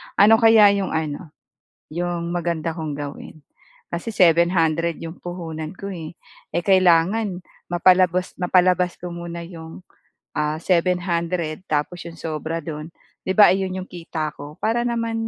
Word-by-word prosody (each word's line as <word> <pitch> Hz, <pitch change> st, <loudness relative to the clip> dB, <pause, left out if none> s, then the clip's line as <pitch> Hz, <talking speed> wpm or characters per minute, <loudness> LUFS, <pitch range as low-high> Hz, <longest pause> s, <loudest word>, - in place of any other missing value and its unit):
Ano 220 Hz, +3 st, +6 dB
kaya 225 Hz, -3 st, +7 dB
yung 195 Hz, -5 st, -1 dB
ano, 155 Hz, 0 st, -4 dB, 0.6 s
yung 170 Hz, 0 st, -3 dB
maganda 170 Hz, -2 st, -2 dB
kong 160 Hz, -3 st, -5 dB
gawin 145 Hz, +1 st, -8 dB, 0.5 s
kasi 175 Hz, +6 st, -4 dB
700 170 Hz, -2 st, +3 dB
yung 165 Hz, +1 st, -7 dB
puhunan 165 Hz, -3 st, -6 dB
ko, 200 Hz, +1 st, -7 dB
eh. 165 Hz, -3 st, -7 dB, 0.4 s
Eh, 175 Hz, -, +1 dB
kailangan 185 Hz, +1 st, +3 dB, 0.3 s
mapalabas 180 Hz, +1 st, +3 dB
mapalabas 180 Hz, 0 st, +3 dB
ko 180 Hz, -, -5 dB
muna 170 Hz, 0 st, -6 dB
yung, 165 Hz, 0 st, -10 dB, 0.5 s
ah, 150 Hz, 0 st, -1 dB
700, 175 Hz, -2 st, 0 dB
tapos 155 Hz, +3 st, -1 dB
'yong 165 Hz, -1 st, -10 dB
sobra 160 Hz, +1 st, -4 dB
do'n, 155 Hz, 0 st, -7 dB, 0.3 s
'di -, -, -4 dB
ba 205 Hz, -3 st, +8 dB
ayon 190 Hz, -1 st, -2 dB
yung 185 Hz, -, -6 dB
kita 165 Hz, -3 st, -5 dB
ko? 145 Hz, +2 st, -11 dB
Para 230 Hz, +2 st, 0 dB
naman 230 Hz, -1 st, -1 dB
170 Hz, 135 wpm, -22 LUFS, 160-185 Hz, 0.6 s, ba